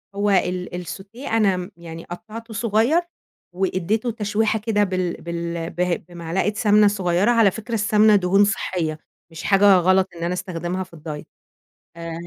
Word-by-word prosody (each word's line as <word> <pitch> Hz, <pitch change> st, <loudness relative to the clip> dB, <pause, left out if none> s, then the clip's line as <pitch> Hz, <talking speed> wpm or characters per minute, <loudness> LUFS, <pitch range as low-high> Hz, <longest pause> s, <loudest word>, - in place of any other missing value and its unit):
هو 205 Hz, +1 st, 0 dB
ال 180 Hz, -2 st, +1 dB, 0.2 s
الsautée 205 Hz, -, -9 dB
أنا 210 Hz, -4 st, +3 dB
م 180 Hz, +2 st, -6 dB
يعني 165 Hz, -1 st, -9 dB
قطعّته 220 Hz, +5 st, -9 dB
صغيّر، 230 Hz, +8 st, +2 dB, 0.5 s
وإديته 195 Hz, +5 st, -1 dB
تشويحة 215 Hz, 0 st, 0 dB
كده، 210 Hz, -1 st, +1 dB
بال 185 Hz, -2 st, -1 dB
بال 170 Hz, -1 st, -4 dB
بهي 180 Hz, 0 st, 0 dB
بمعلقة 175 Hz, +3 st, -3 dB
سَمنة 210 Hz, 0 st, +4 dB
صغيّرة، 195 Hz, +1 st, +1 dB
على 225 Hz, -4 st, +4 dB
فكرة 230 Hz, +4 st, -7 dB
السَمنة 215 Hz, 0 st, +4 dB
دهون 195 Hz, +1 st, +4 dB
صحيّة، 165 Hz, -6 st, -2 dB, 0.3 s
مش 165 Hz, 0 st, -9 dB
حاجة 200 Hz, 0 st, +5 dB
غلط 185 Hz, +1 st, +3 dB
إن 170 Hz, -, -6 dB
أنا 175 Hz, +1 st, -1 dB
أستخدمها 180 Hz, 0 st, -4 dB
في 175 Hz, -2 st, -15 dB
الdiet، 150 Hz, -1 st, -7 dB, 0.7 s
آآ، 165 Hz, 0 st, -6 dB
190 Hz, 150 wpm, -22 LUFS, 175-210 Hz, 0.7 s, حاجة